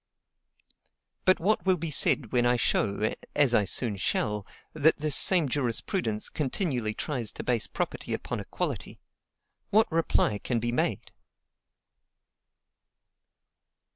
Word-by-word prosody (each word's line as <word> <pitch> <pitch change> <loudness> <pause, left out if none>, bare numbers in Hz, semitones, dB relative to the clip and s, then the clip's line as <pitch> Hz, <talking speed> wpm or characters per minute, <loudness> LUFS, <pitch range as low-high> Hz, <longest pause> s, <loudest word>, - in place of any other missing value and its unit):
But 185 - +4
what 210 +6 +1
will 185 -1 +2
be 165 -1 -4
said 130 -4 +4
when 125 -1 +2
I 120 0 +3
show, 110 -2 0 0.2
as 145 -4 +3
I 105 -3 +3
soon 105 +1 +1
shall, 105 +1 -1 0.3
that 155 +1 +3
this 150 -2 +1
same 175 -6 +5
jurisprudence 120 - -1
continually 130 - -2
tries 125 -7 -2
to - - -7
base 120 -3 0
property - - -4
upon - - -4
equality? - - -5 0.7
What 220 +1 +3
reply 160 -10 +1
can 120 - -2
be 120 +1 -2
made? 120 - -2
125 Hz, 120 wpm, -27 LUFS, 110-160 Hz, 0.7 s, same